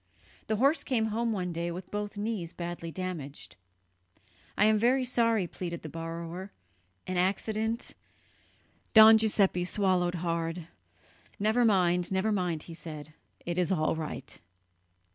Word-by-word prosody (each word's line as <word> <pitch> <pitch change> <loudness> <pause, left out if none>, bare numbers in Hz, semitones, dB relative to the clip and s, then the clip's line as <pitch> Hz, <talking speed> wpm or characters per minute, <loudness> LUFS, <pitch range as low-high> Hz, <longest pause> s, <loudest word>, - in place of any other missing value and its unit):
The 220 - +1
horse 275 +8 +3
came 225 -5 0
home 230 +1 0
one 180 -4 -2
day 170 +1 -2
with 175 +2 -7
both 205 0 -4
knees 205 -5 -3
badly 170 -1 -5
damaged. 165 -6 -6 1.0
"I 210 - +5
am 215 0 +4
very 255 +3 +3
sorry," 230 -5 +2
pleaded 170 -1 -6
the 155 - -6
borrower, 165 +3 -6 0.5
"an 185 - -3
accident... 215 +5 -1 0.5
." - - -36
Don 220 0 +10
Giuseppe 200 -4 +2
swallowed 185 -2 +1
hard. 165 -1 -2 0.7
"Never 220 +4 +2
mind, 180 -5 +3
never 190 +3 +1
mind," 180 -6 -1
he 170 - -10
said; 155 -2 -9 0.3
"it 175 +1 -2
is 180 +1 +1
all 155 -3 +1
right." 155 -4 -6
185 Hz, 140 wpm, -29 LUFS, 170-220 Hz, 1.0 s, Don